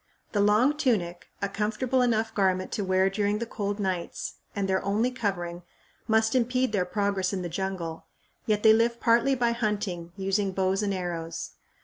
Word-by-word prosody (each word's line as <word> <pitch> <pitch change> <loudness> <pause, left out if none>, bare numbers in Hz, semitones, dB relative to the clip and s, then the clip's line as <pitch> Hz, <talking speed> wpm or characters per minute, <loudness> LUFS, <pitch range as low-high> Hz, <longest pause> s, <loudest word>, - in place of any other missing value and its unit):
The 205 - 0
long 215 +8 +4
tunic, 190 - 0 0.2
a - - +2
comfortable 220 +6 0
enough 225 -2 +1
garment 185 -2 +1
to 205 - -2
wear 185 0 +3
during 205 +1 0
the 235 - -3
cold 205 -2 -3
nights, 185 -4 -3 0.2
and 200 -1 -1
their 190 0 +1
only 215 +5 +1
covering, 175 -8 -3 0.5
must 220 0 +3
impede 255 0 +1
their 195 -4 +1
progress 200 0 0
in 185 -2 -2
the 175 - -3
jungle; 175 -2 -4 0.4
yet 210 -1 +1
they 220 -1 +8
live 235 +1 +2
partly 240 +3 +3
by 240 -2 +2
hunting, 210 -7 -2
using 195 0 0
bows 190 +1 +1
and 205 -1 0
arrows. 170 -3 -4
205 Hz, 170 wpm, -27 LUFS, 185-225 Hz, 0.5 s, they